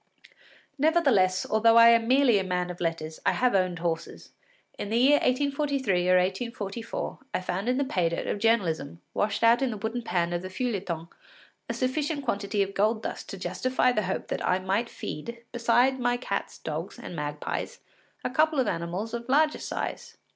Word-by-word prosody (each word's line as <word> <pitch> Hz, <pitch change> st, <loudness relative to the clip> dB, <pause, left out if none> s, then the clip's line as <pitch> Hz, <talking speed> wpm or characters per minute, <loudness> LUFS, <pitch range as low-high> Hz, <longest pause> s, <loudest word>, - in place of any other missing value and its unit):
Nevertheless, 275 Hz, -, +3 dB
although 225 Hz, +1 st, +4 dB
I 230 Hz, 0 st, +9 dB
am 230 Hz, -1 st, +4 dB
merely 255 Hz, -4 st, +4 dB
a -, -, -1 dB
man 180 Hz, -1 st, -1 dB
of 175 Hz, -, -10 dB
letters, 165 Hz, -2 st, -3 dB
I -, -, +3 dB
have 250 Hz, -2 st, +2 dB
owned 185 Hz, -2 st, +1 dB
horses. 165 Hz, 0 st, -4 dB, 0.5 s
In 205 Hz, -, -4 dB
the 225 Hz, -, +1 dB
year 275 Hz, +4 st, +6 dB
1843 275 Hz, -9 st, +1 dB
or 185 Hz, -, +6 dB
1844, 200 Hz, +3 st, -3 dB, 0.2 s
I -, -, +1 dB
found 185 Hz, +5 st, -2 dB
in 255 Hz, -, +1 dB
the 280 Hz, -, +2 dB
pay 180 Hz, -9 st, +1 dB
dirt 170 Hz, -, -3 dB
of -, -, -2 dB
journalism, 175 Hz, -9 st, +1 dB
washed 205 Hz, +1 st, -1 dB
out 230 Hz, +2 st, +5 dB
in 265 Hz, -, +1 dB
the 220 Hz, -, -4 dB
wooden 220 Hz, +4 st, -3 dB
pan 175 Hz, -6 st, -1 dB
of 175 Hz, -, -1 dB
the 185 Hz, -, -6 dB
feuilleton, 185 Hz, -7 st, -3 dB, 0.6 s
a -, -, 0 dB
sufficient 285 Hz, +2 st, -1 dB
quantity 200 Hz, -3 st, 0 dB
of 195 Hz, 0 st, -6 dB
gold 215 Hz, +3 st, +1 dB
dust -, -, -5 dB
to 195 Hz, -, -6 dB
justify 250 Hz, +8 st, +1 dB
the 215 Hz, -, 0 dB
hope 190 Hz, -1 st, -3 dB
that -, -, -2 dB
I 180 Hz, -, +2 dB
might 195 Hz, +5 st, -1 dB
feed, 235 Hz, +10 st, -7 dB
besides 240 Hz, +2 st, +2 dB
my 245 Hz, 0 st, +1 dB
cats, 250 Hz, -, -4 dB
dogs, -, -, -5 dB
and -, -, -8 dB
magpies, 150 Hz, -1 st, -4 dB, 0.4 s
a -, -, -2 dB
couple 310 Hz, +2 st, +2 dB
of 260 Hz, -, +3 dB
animals 180 Hz, +5 st, -3 dB
of 235 Hz, +1 st, -5 dB
larger 305 Hz, +3 st, +3 dB
size. -, -, -5 dB
220 Hz, 185 wpm, -27 LUFS, 185-250 Hz, 0.6 s, I